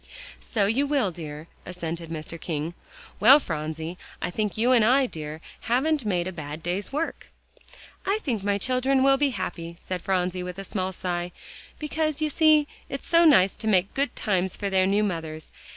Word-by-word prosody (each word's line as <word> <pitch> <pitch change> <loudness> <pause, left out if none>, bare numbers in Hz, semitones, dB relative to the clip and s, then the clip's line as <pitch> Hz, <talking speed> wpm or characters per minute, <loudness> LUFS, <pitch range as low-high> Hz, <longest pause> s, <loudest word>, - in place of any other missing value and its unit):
"So 210 -5 0
you 255 +8 +1
will, 275 -9 +1
dear," 155 -2 -7 0.2
assented 170 -2 -5
Mr. 165 +1 -6
King. 160 0 -3 0.5
"Well, 265 +7 +8
Phronsie, 160 - -4 0.2
I 175 - -2
think 210 +2 -2
you 240 +3 +3
and 240 -3 +5
I, 260 +4 +5
dear, 155 -7 -7 0.2
haven't 275 +3 +1
made 180 -4 0
a 185 - -3
bad 155 -2 -7
day's 185 +6 -2
work." 310 +4 -3 0.8
"I 395 +2 +1
think 230 -8 -1
my 200 0 +1
children 260 +4 +2
will 270 0 +5
be 290 0 +2
happy," 170 -8 -5
said 185 -2 -4
Phronsie 185 -1 0
with 180 0 -6
a 195 - -5
small 190 -1 -2
sigh, 175 -1 -3 0.5
"because 310 0 -1
you 310 -1 +1
see 305 -1 +5 0.2
it's 275 - -5
so 335 0 +5
nice 195 - +6
to 220 - -4
make 195 -2 +2
good 275 -2 -1
times 190 -3 0
for 200 -1 -3
their 190 -1 +3
new 205 +2 +2
mothers. 160 -5 -4
195 Hz, 185 wpm, -26 LUFS, 175-265 Hz, 0.8 s, Well